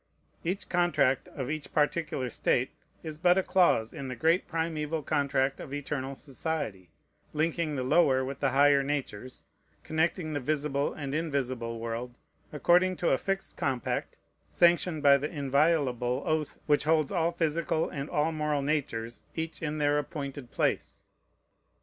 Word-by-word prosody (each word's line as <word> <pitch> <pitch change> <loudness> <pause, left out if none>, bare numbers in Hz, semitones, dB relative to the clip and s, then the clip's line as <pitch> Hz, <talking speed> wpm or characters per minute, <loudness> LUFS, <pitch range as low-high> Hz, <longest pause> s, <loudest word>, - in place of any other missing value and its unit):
Each 185 +4 -2
contract 175 -7 +2
of 135 -1 -5
each 155 -2 -5
particular 150 -4 0
state - - +1 0.3
is 155 -1 -6
but 180 +1 +4
a 190 - +3
clause 175 - +3
in 140 -4 -6
the 130 - -4
great 165 +5 +2
primeval 160 -2 -2
contract 140 -1 +1
of 140 - -6
eternal 140 -1 -3
society, 135 - -4 0.4
linking 155 0 0
the 130 - -1
lower 130 -1 +3
with 135 +1 -5
the 135 - +2
higher 140 +1 +5
natures, 135 -4 -4 0.4
connecting 160 0 0
the 145 - -1
visible 145 0 0
and 140 -3 -5
invisible 130 -7 -2
world, 115 +2 -4 0.4
according 175 +5 +3
to 175 - +1
a 135 - +3
fixed 195 0 -3
compact 130 -3 -2 0.3
sanctioned 170 -2 +3
by 140 -1 +7
the 145 +2 -3
inviolable 140 -4 +1
oath 155 -1 -1
which 150 0 +2
holds 155 0 +2
all 170 -3 +1
physical 165 -1 0
and 140 +1 -5
all 150 +2 +1
moral 150 -2 -1
natures 125 -6 -2
each 160 0 -4
in 155 -1 -2
their 145 0 +2
appointed 140 -3 -6
place. - - -1
145 Hz, 150 wpm, -29 LUFS, 135-160 Hz, 0.4 s, by